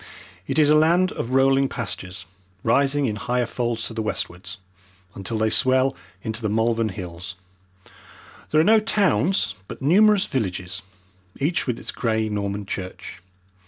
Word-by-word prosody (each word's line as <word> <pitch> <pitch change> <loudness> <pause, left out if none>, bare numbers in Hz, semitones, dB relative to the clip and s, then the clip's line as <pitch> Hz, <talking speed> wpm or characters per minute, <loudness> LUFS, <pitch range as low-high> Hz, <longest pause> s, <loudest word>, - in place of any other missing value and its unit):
It - - -2
is 150 -1 +5
a - - +6
land 170 +4 +4
of 115 - -4
rolling 135 +1 +3
pastures, 95 -6 -5 0.4
rising 140 0 +2
in 105 -4 -2
higher 125 +3 0
folds 115 -1 -2
to - - -3
the 110 - -3
westwards, 90 -4 -4 0.6
until 100 +4 -4
they 110 0 +1
swell 130 +1 +3 0.3
into 110 -2 -3
the 110 - -1
Malvern 115 +1 +1
Hills. 90 -1 -7 1.1
There 155 - +3
are - - +5
no 220 +5 +6
towns, 195 - +2
but - - -8
numerous 200 +7 +4
villages, 95 -5 -3 0.6
each 150 +4 0
with 120 -2 -1
its - - -5
grey 110 -2 -1
Norman 100 -1 -3
church. 95 -2 -7
115 Hz, 150 wpm, -23 LUFS, 105-140 Hz, 1.1 s, a